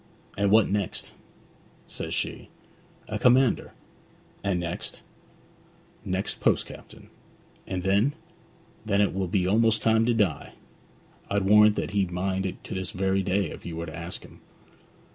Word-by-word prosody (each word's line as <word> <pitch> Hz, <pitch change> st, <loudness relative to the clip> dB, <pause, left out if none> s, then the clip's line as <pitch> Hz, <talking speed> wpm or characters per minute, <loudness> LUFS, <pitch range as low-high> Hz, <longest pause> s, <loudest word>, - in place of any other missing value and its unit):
"And 100 Hz, 0 st, +1 dB
what 110 Hz, +1 st, +5 dB
next?" 100 Hz, -2 st, -2 dB, 0.7 s
says -, -, -6 dB
she. -, -, -3 dB, 0.6 s
"A 105 Hz, -, -3 dB
commander." 125 Hz, 0 st, +3 dB, 0.7 s
"And 100 Hz, -3 st, 0 dB
next?" 85 Hz, 0 st, -5 dB, 1.0 s
"Next, 95 Hz, +2 st, -2 dB
post -, -, +2 dB
captain." -, -, -13 dB, 0.6 s
"And 90 Hz, -1 st, -3 dB
then?" 100 Hz, +9 st, +3 dB, 0.7 s
"Then 100 Hz, -2 st, +1 dB
it 105 Hz, -, +3 dB
will 95 Hz, 0 st, -1 dB
be 90 Hz, 0 st, +1 dB
almost 110 Hz, +2 st, +3 dB
time 110 Hz, 0 st, +3 dB
to 120 Hz, -, +3 dB
die." 100 Hz, -9 st, 0 dB, 0.8 s
I'd 100 Hz, 0 st, +1 dB
warrant 105 Hz, +1 st, +6 dB
that -, -, -3 dB
he'd 100 Hz, -3 st, +1 dB
mind 95 Hz, +2 st, -1 dB
it 95 Hz, -, -8 dB
to -, -, -7 dB
this 95 Hz, -1 st, -3 dB
very 95 Hz, +1 st, 0 dB
day 95 Hz, -2 st, 0 dB
if -, -, -10 dB
you 85 Hz, -, -6 dB
were 85 Hz, +1 st, -4 dB
to 80 Hz, -, -8 dB
ask 85 Hz, +1 st, -6 dB
him.' -, -, -16 dB
100 Hz, 150 wpm, -26 LUFS, 95-105 Hz, 1.0 s, warrant